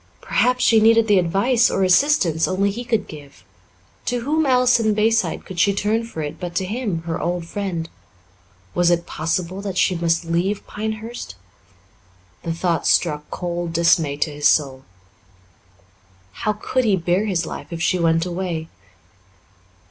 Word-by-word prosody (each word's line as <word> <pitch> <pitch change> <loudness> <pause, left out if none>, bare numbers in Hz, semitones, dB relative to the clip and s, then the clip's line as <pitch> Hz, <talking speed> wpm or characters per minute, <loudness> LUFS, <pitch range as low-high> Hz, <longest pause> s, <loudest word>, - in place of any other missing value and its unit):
Perhaps 250 0 +1
she 225 - +5
needed 225 +1 +4
the 205 -3 +5
advice 200 +8 +2
or 195 - 0
assistance 185 - +3
only 195 +2 0
he 235 +5 -6
could 225 -2 -1
give. 140 - -12 0.6
To 245 -1 -1
whom 300 +4 0
else 250 -1 +4
in 220 -2 +1
Bayside 225 +2 +1
could 185 -3 -7
she 200 +3 +3
turn 220 +3 0
for 160 -9 -6
it 150 +2 -6
but 175 -2 -6
to 190 - 0
him, 205 -5 -3
her 165 +1 -4
old 175 0 -2
friend? 175 -3 -4 0.9
Was 175 -1 +2
it 170 -1 +1
possible 175 +4 -3
that 195 -2 -5
she 185 - +3
must 170 0 0
leave 175 +5 -1
Pinehurst? 220 - -6 1.1
The 165 - -4
thought 170 0 -1
struck 150 -3 +1
cold 175 -1 -4
dismay 165 -3 +2
to 150 +1 -1
his 145 0 +1
soul. 135 -3 +1 1.5
How 210 - -2
could 255 +5 -1
he 210 -4 +3
bear 180 +4 0
his 175 -4 0
life - - -7
if 170 - -5
she 180 +2 +1
went 165 0 +2
away? 175 -3 -4
180 Hz, 160 wpm, -21 LUFS, 165-220 Hz, 1.5 s, she